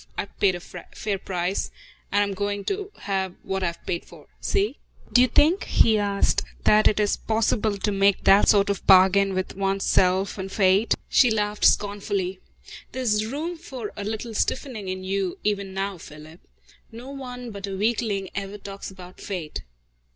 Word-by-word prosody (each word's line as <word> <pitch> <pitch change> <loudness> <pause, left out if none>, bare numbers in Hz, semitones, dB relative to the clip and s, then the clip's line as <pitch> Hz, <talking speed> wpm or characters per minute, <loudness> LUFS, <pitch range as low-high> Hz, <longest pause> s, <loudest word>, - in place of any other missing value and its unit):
I've - - -5
paid 190 -3 +3
a - - -5
fair 190 +3 -6
price, 180 +1 -2 0.4
and 205 +1 +3
I'm 200 -1 -2
going 205 0 -3
to 400 0 -3
have 190 -2 -2
what 190 0 -2
I've 170 -2 -3
paid 170 - -2
for. - - -15
See?" 400 +1 0 0.3
"Do 245 - +7
you 255 - +5
think," 310 - +3
he 220 -2 +3
asked, 200 -1 +1 0.2
"that 215 0 +5
it 215 - +2
is 205 -1 +2
possible 220 -1 0
to 205 +2 -1
make 195 0 +2
that 195 +1 +6
sort 200 -1 +4
of 200 - -4
bargain 190 +1 +6
with 185 0 -3
one's 195 0 -1
self 190 +2 +2
and 190 0 -5
fate?" 195 +2 +3
She 250 - +5
laughed 210 -1 0
scornfully. 200 -2 +1 0.5
"There's 220 -4 0
room 310 +8 -4
for 255 -10 -7
a 205 - -5
little 220 +2 -4
stiffening 220 -2 -2
in 185 0 -4
you, 190 -1 -2
even 200 -2 -1
now, 195 -1 -3
Philip! 155 +2 -12 0.5
No 240 +4 -9
one 250 -3 -7
but 200 -1 -6
a 195 -1 -4
weakling 210 -2 -1
ever 200 +1 -5
talks 200 -1 -8
about 185 -1 -13
fate. 175 -6 -5
200 Hz, 175 wpm, -24 LUFS, 190-220 Hz, 0.5 s, Do